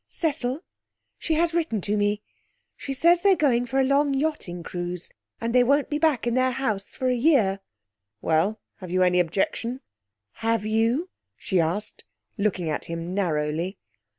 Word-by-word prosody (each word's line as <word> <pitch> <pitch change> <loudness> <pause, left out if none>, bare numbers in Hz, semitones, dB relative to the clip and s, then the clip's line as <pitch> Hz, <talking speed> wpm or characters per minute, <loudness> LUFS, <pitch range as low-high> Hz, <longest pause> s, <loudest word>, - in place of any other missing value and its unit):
'Cecil, 280 -3 -2 0.6
she 320 - 0
has 335 +1 +2
written 330 -10 0
to 205 +3 -1
me. 205 0 0 0.5
She 275 - -6
says 340 +6 +4
they're 395 0 +5
going 245 -6 +2
for 265 +3 0
a - - +4
long 275 +1 +2
yachting 270 - -2
cruise, 175 0 -5 0.3
that 230 0 -2
they 250 0 +6
won't 280 +4 +2
be 295 - 0
back 305 -7 +2
in 240 - +1
their 255 +1 +3
house 215 -7 -2
for 260 - -1
a 250 - +3
year.' 235 -8 +3 0.6
'Well, 165 - +1 0.2
have 185 -3 -9
you 185 +1 +2
any 180 0 +3
objection?' 200 +8 -1 0.6
'Have 225 -2 0
you?' 230 +11 +1 0.3
she 190 -4 0
asked, 175 +6 -1 0.3
looking 195 -4 -1
at 150 - -2
him 170 +1 -5
narrowly. 170 0 -1
230 Hz, 165 wpm, -25 LUFS, 185-275 Hz, 0.6 s, they